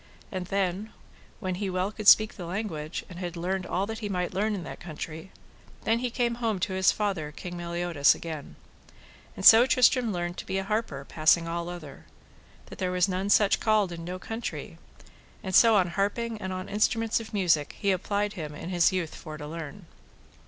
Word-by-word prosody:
And 185 -3 -4
then 195 +2 -1 0.5
when 185 -3 -2
he 200 - -1
well 185 +2 -1
could 215 -1 -6
speak 215 0 +7
the 175 -3 -7
language, 170 -5 -4
and 180 -1 -10
had 175 -1 -5
learned 185 +2 -2
all 190 +2 0
that 220 +1 -5
he 210 -2 -4
might 180 -2 -2
learn 210 +2 0
in 185 - -5
that - - -8
country, 160 +1 -7 0.5
then 225 +1 +2
he 250 0 -1
came 240 0 0
home 225 -4 0
to 190 - -1
his 190 0 +4
father, 190 -8 -2
King 175 +3 -7
Meliodas, 170 -3 +2
again. 155 -4 -7 0.8
And - - -5
so 230 +3 +9
Tristram 250 -2 +4
learned 175 -1 -3
to - - -6
be 190 - -1
an 195 - -2
harper 205 -10 -2
passing 165 +3 +3
all 170 +1 -3
other, 155 -6 -9 0.6
that - - -12
there 185 - 0
was 180 +1 +2
none 190 +1 -2
such 205 -1 +4
called 215 -4 +2
in 170 -1 -7
no 180 +2 -5
country, 225 +5 -6 0.6
and 190 - -4
so 225 +3 +7
on 185 -3 +3
harping 210 +4 -2
and 190 - -4
on 185 0 -5
instruments 225 +2 +1
of 225 - -9
music 170 -8 +1
he 200 -2 +1
applied 205 +2 -1
him 150 -5 -6
in 165 - -7
his 175 -2 +3
youth 180 -4 -2
for 155 -2 -8
to 150 - -7
learn. 165 +4 -7
185 Hz, 200 wpm, -27 LUFS, 170-210 Hz, 0.8 s, so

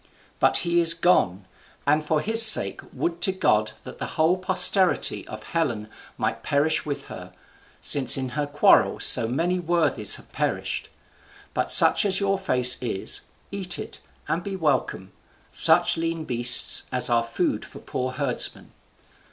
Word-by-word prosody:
But - - +2
he 170 0 0
is 165 0 +5
gone; 100 - -1 0.4
and 150 +2 0
for 155 0 -2
his 225 +5 +6
sake 220 - +6
would 170 0 -5
to 190 - +2
God 110 - -1
that - - -13
the - - -5
whole 160 +3 +1
posterity 185 - 0
of 110 0 -11
Helen 120 -11 -4 0.3
might - - -4
perish 150 +2 -2
with 145 - -5
her, - - -12 0.5
since 135 -3 +3
in 130 -1 -5
her 145 +4 -5
quarrel 145 +1 +1
so 115 - +3
many 170 +9 -3
worthies 160 - +1
have - - -16
perished! - - -4 0.6
But - - -3
such - - +7
as 200 -2 +2
your 195 -1 -2
fare 130 -10 -3 0.2
is, 115 -6 -4 0.3
eat 190 -3 -4
it, - - -10 0.3
and 170 +2 -4
be 195 0 -7
welcome 135 - -3 0.4
such - - +3
lean 165 -1 -5
beasts 120 0 +3
as 125 -1 +1
are 120 -1 0
food 115 0 -4
for - - -14
poor 130 0 -6
herdsmen. 140 -1 -5
155 Hz, 155 wpm, -22 LUFS, 125-175 Hz, 0.6 s, such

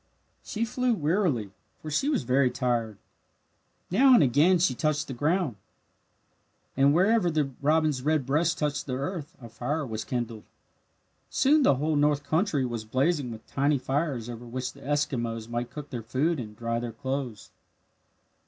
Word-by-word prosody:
She 225 +2 -2
flew 250 +1 0
wearily, 150 - 0 0.3
for 155 - -7
she 270 - +1
was 285 -6 0
very 130 0 +3
tired. 120 -4 -1 0.9
Now 260 +7 +6
and 175 - +6
again 150 +8 +4
she 170 -6 +2
touched 150 +2 -1
the 135 - -5
ground. 150 - 0 1.2
And 140 +1 +4
wherever 190 +4 +3
the 150 -4 0
robin's 155 -2 +2
red 150 -1 +1
breast 150 +5 +1
touched 145 -1 -2
the 130 - -2
earth 160 +4 -5
a 120 - -10
fire 140 +7 -3
was 110 -3 -4
kindled. 120 -3 -4 0.8
Soon 295 +3 +3
the 260 - +5
whole 150 +4 0
north 145 0 +2
country 155 -2 +1
was 120 -3 -4
blazing 135 +4 0
with 110 -1 -9
tiny 140 +1 +1
fires 135 -2 -2
over 120 0 -8
which 130 +2 -4
the - - -16
Eskimos 120 -6 -2
might 120 +1 -3
cook 150 +1 -9
their 120 -3 -4
food 135 +8 0
and 105 -3 -7
dry 115 +1 -2
their 120 -1 -5
clothes. 130 -4 -4
140 Hz, 160 wpm, -27 LUFS, 120-160 Hz, 1.2 s, Now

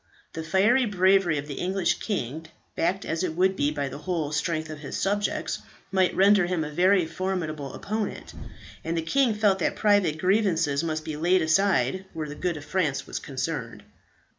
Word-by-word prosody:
The 165 - -4
fiery 210 +10 +3
bravery 190 -4 +3
of 145 +1 -4
the 140 - -6
English 185 0 0
king, 160 - -3 0.3
backed 185 +4 0
as 165 +2 -2
it 165 -3 -2
would 190 +2 +2
be 145 -5 +1
by 145 -2 -2
the 135 - -7
whole 160 -3 -2
strength 155 +1 -1
of 155 - -7
his 145 - -5
subjects, 205 +1 -1 0.3
might 190 -2 +2
render 195 -1 +5
him 175 -3 -1
a 150 - -5
very 185 +3 +3
formidable 160 -5 -4
opponent; 215 0 -4 0.5
and 165 +1 -2
the 165 - -1
king 240 +6 +2
felt 205 -3 +2
that - - 0
private 205 -7 +2
grievances 170 -6 +1
must 155 -1 -3
be 155 -2 -4
laid 175 +2 +3
aside 185 -1 +2
where 155 -1 -4
the 145 - -6
good 170 +1 -2
of 145 - -9
France 155 -4 -1
was - - -5
concerned. 130 -3 -4
170 Hz, 185 wpm, -26 LUFS, 155-190 Hz, 0.5 s, render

